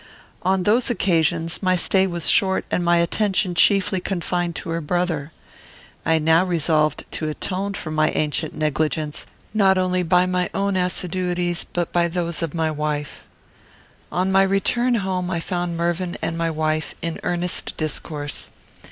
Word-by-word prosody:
On 190 0 +1
those 230 +6 +2
occasions, 165 -6 +1
my 185 -2 +3
stay 190 +2 +2
was 170 -4 -4
short, 190 -1 +3
and 180 - +1
my 175 0 +4
attention 185 +2 +1
chiefly 190 +1 +3
confined 175 -2 -2
to - - -6
her 165 0 -1
brother. 165 -2 -1 0.8
I 160 - +4
now 160 +2 +4
resolved 155 -4 +1
to 155 - -3
atone 195 +5 -3
for 155 - -5
my 155 0 +2
ancient 155 +1 -1
negligence, 155 0 -1 0.3
not 195 -3 +4
only 185 0 +1
by 180 +1 +3
my 180 -1 0
own 200 0 0
assiduities, 180 -1 0
but 175 -1 -3
by 175 -1 +3
those 170 -1 -2
of 165 -1 -3
my 160 -1 0
wife. 150 -1 -4 0.8
On 185 +2 0
my 195 0 +5
return 195 +6 +2
home, 185 -4 -1
I 170 -2 -1
found 175 0 -3
Mervyn 175 +1 -1
and 165 - -2
my 165 0 0
wife 155 0 -1
in 165 -1 -3
earnest 175 0 -1
discourse. 150 -1 -4
175 Hz, 155 wpm, -22 LUFS, 160-185 Hz, 0.8 s, my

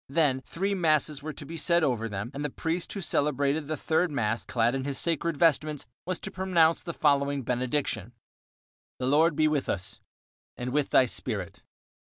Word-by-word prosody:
Then 140 -3 +2
three 195 +9 -2
masses 155 -5 +1
were 155 +2 -4
to 145 - -8
be 165 +3 -7
said 170 +1 +3
over 115 -5 0
them, 105 +4 -4
and 145 - -4
the 150 - -1
priest 165 +5 -3
who 200 - -4
celebrated 145 -2 0
the 155 0 -2
third 160 +5 +1
mass, 115 -6 -1
clad 120 -1 +1
in 135 -1 -2
his 140 -1 -3
sacred 165 -1 0
vestments, 155 -3 +2 0.2
was 185 -2 -1
to - - -6
pronounce 170 -3 +3
the 170 - -5
following 140 -3 +1
benediction: 125 -3 -1 0.8
The 125 - -3
Lord 150 +4 +4
be 155 0 +3
with 150 -3 0
us. 95 0 -4 0.6
And 125 0 -4
with 145 -1 +1
thy 130 - +5
spirit. 105 -7 -4
145 Hz, 180 wpm, -28 LUFS, 130-160 Hz, 0.8 s, thy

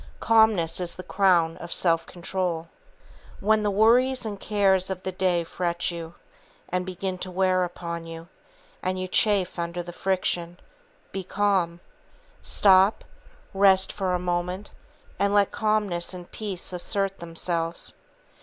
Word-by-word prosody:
Calmness 220 -8 +3
is 175 -1 -2
the 185 - -8
crown 180 -4 +2
of 170 - -9
self 165 -2 +3
control. 175 -2 -3 0.7
When 215 +2 +3
the 210 - +1
worries 240 +5 +3
and 205 -2 -5
cares 195 -3 +2
of 185 -1 -5
the 190 - -3
day 180 -2 +1
fret 175 +1 -2
you, 170 0 -7 0.5
and 180 +1 -2
begin 185 0 -4
to 185 - -5
wear 185 0 +2
upon 170 -1 -5
you, 165 0 -9 0.5
and 185 0 -2
you 185 - -3
chafe 190 -2 +1
under 170 +1 -3
the 175 0 -9
friction, 175 -2 -1 0.5
be 195 - -4
calm. 185 -3 0 0.6
Stop, 195 +1 +4 0.5
rest 195 -1 +4
for 190 -3 -1
a - - +2
moment, 180 +2 -3 0.5
and 200 0 +2
let 200 -1 +4
calmness 210 -5 -1
and 175 -1 -10
peace 195 -4 -4
assert 195 +2 -1
themselves. 165 0 -1
185 Hz, 140 wpm, -25 LUFS, 175-195 Hz, 0.7 s, Stop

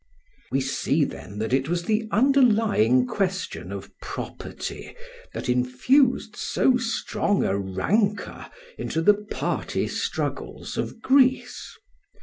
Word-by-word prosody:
] - - -33
We 135 - +1
see 140 +3 +1
then 105 -6 -6
that 110 +3 -2
it 135 +2 +1
was 175 0 0
the 220 +3 0
underlying 215 - +4
question 185 - -2
of 100 0 -8
property - - -7 0.4
that - - -5
infused 125 - +2
so 260 - +2
strong 225 -4 0
a 95 - +1
rancour 195 - -1 0.3
into 165 - -2
the 210 - +7
party 210 +1 -2
struggles - - -4
of 225 - -4
Greece. 265 -1 +2
195 Hz, 120 wpm, -25 LUFS, -, 0.4 s, the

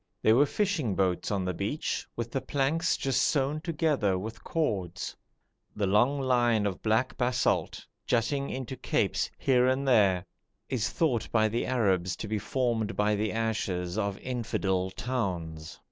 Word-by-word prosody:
There 110 - +6
were 145 +4 +5
fishing 165 - 0
boats 95 -2 0
on 100 -3 -1
the 90 - -1
beach, 100 - -2
with 115 0 -4
the 135 - -1
planks 140 +5 0
just 135 -2 +1
sewn 145 +1 +1
together 150 - +1
with 110 +4 -7
cords. 95 - -2 0.6
The 105 - 0
long 120 +9 +3
line 120 -5 +2
of 95 -3 -2
black 110 +4 +1
basalt, 125 0 0 0.2
jutting 140 +4 +1
into 130 0 -4
capes - - 0
here 125 -2 +3
and 130 +2 +1
there, 100 -7 +4 0.4
is 125 -5 0
thought 130 -9 0
by 110 -1 +3
the 115 +2 -1
Arabs 95 -8 +1
to 110 - -6
be 105 0 -1
formed 115 -1 -1
by 105 +1 +2
the 105 +1 0
ashes 100 -6 -1
of 100 -2 -1
infidel 100 -7 -1
towns. 90 -10 -4
115 Hz, 155 wpm, -29 LUFS, 100-130 Hz, 0.6 s, There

